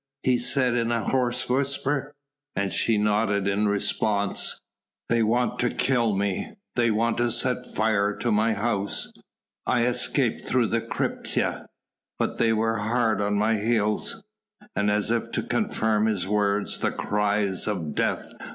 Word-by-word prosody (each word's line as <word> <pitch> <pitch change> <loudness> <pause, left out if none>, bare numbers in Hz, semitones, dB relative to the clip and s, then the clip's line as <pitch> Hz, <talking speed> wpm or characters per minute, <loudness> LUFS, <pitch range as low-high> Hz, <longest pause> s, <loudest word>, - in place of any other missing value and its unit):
he 130 - +3
said 125 0 +2
in 120 -1 0
a 115 -2 0
hoarse 125 0 0
whisper. 140 +2 0 0.4
And 100 0 -1
she 115 -2 +3
nodded 105 -1 +1
in 100 +1 +1
response. 100 0 0 0.5
"They 115 0 +3
want 120 +3 +1
to 120 - +2
kill 120 -6 +1
me... 100 -1 -2 0.2
they 120 -1 +3
have 115 +2 +1
set 125 0 -1
fire 105 -2 +1
to 120 - -1
my 110 +2 +3
house... 100 -2 -2 0.5
I 120 -2 +2
escaped 125 - 0
through - - +2
the - - +1
crypta.... - - -2 0.5
But - - -1
they 115 -1 +3
were 110 +1 +1
hard 110 0 +1
on 105 0 0
my 110 +2 +2
heels...." 105 -1 0 0.5
And 100 0 +1
as 105 +1 +1
if 115 -1 0
to - - -1
confirm 110 -1 +1
his 95 -5 -1
words, 105 0 0
the - - +1
cries 105 -2 0
of 85 -8 -2
"Death!" - - -1
110 Hz, 150 wpm, -25 LUFS, 105-120 Hz, 0.5 s, he